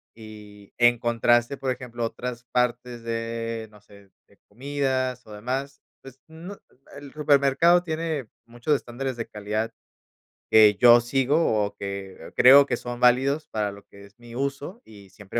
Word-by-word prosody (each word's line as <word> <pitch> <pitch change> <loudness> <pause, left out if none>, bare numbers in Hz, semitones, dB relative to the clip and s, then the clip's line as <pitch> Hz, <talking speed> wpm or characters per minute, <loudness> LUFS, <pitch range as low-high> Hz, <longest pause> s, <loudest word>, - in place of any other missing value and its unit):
Y 105 -2 -14
en 120 -1 +4
contraste, 120 +3 +1
por 130 -1 -2
ejemplo 120 -1 -6
a - - +1
otras 120 0 -7
partes 125 -1 -1
de 115 0 -4
no 105 - -19
sé 100 -2 -20 0.2
de - - -26
comidas 130 +1 -3
o 105 - -12
demás, 130 +6 -5 0.2
pues 135 0 -14
no 165 +4 -10 0.2
el 130 - -31 0.2
el 140 - -13
supermercado 150 +3 +3
tiene 160 -5 -3 0.2
muchos 120 +5 -1
estándares 130 0 -5
de 115 - -5
calidad 105 +2 -4 0.8
que 105 -1 +6
yo 120 +3 +7
sigo 130 -1 +1
o 100 - -5
que, 100 -1 -7
eh, 80 - -12
creo 140 +3 +8
que 125 - -1
son 120 0 -7
válidos 135 +5 +2
para 105 -5 -3
lo 100 0 -14
que 100 0 -16
es 100 +4 -19
mi 120 0 -13
uso 140 - -4
y 100 -3 -16
siempre 100 +4 -6
120 Hz, 170 wpm, -24 LUFS, 110-135 Hz, 0.8 s, creo